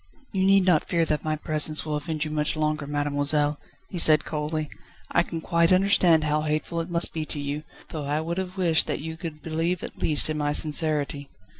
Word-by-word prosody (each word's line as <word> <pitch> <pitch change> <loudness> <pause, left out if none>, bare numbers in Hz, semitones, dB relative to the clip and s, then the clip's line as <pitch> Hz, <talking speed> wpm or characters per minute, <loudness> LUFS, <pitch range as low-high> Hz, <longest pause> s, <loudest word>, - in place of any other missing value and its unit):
"You 190 -1 0
need 195 -1 +4
not 175 -5 +3
fear 170 -1 +1
that 150 -2 -1
my 155 0 -1
presence 155 0 +1
will 155 -1 -2
offend 155 +1 -3
you 155 - -5
much 150 0 -1
longer, 155 -1 -2
mademoiselle," 145 0 0 0.3
he 180 - -4
said 155 -2 +7
coldly. 155 0 -3 0.4
"I - - +3
can 165 -1 -5
quite 170 0 +1
understand 185 -4 +4
how 150 0 0
hateful 155 +2 -2
it 165 - -7
must 170 -1 +2
be 160 - -3
to 150 - -6
you, 145 +1 -4 0.3
though 150 -3 -5
I 145 +2 -1
would 170 +3 -3
have 185 +1 -6
wished 170 -4 +3
that - - -2
you 160 +2 -6
could 160 -3 -8
believe 165 +2 -2
at - - -8
least 150 -2 +3
in 155 -1 -3
my 145 0 0
sincerity." 150 -2 -1
155 Hz, 210 wpm, -25 LUFS, 150-165 Hz, 0.4 s, said